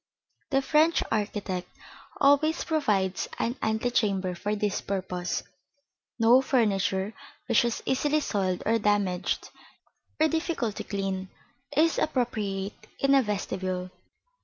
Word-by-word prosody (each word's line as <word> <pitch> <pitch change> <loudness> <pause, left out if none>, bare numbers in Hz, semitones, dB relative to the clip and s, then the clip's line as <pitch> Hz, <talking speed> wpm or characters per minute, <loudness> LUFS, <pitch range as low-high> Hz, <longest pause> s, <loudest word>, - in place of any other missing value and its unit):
The 270 -2 +2
French 315 +4 +3
architect 205 -4 -2 0.5
always 290 +3 +4
provides 210 - 0
an 235 +2 -1
antechamber 220 -4 0
for 205 +4 -2
this 205 -1 -1
purpose. 185 -2 -3 0.7
No 240 +3 +6
furniture 200 -5 +1 0.3
which - - +4
is 235 -1 -2
easily 295 +3 +2
soiled 190 -9 -1
or 225 +1 +3
damaged, 200 -3 0 0.7
or 315 - +5
difficult 320 - -1
to - - -3
keep - - -24
clean, 195 -2 -2 0.5
is 325 +2 +4
appropriate 210 -8 -1 0.3
in 275 0 +3
a 275 - +6
vestibule. 185 -4 -3
210 Hz, 115 wpm, -27 LUFS, 190-270 Hz, 0.7 s, No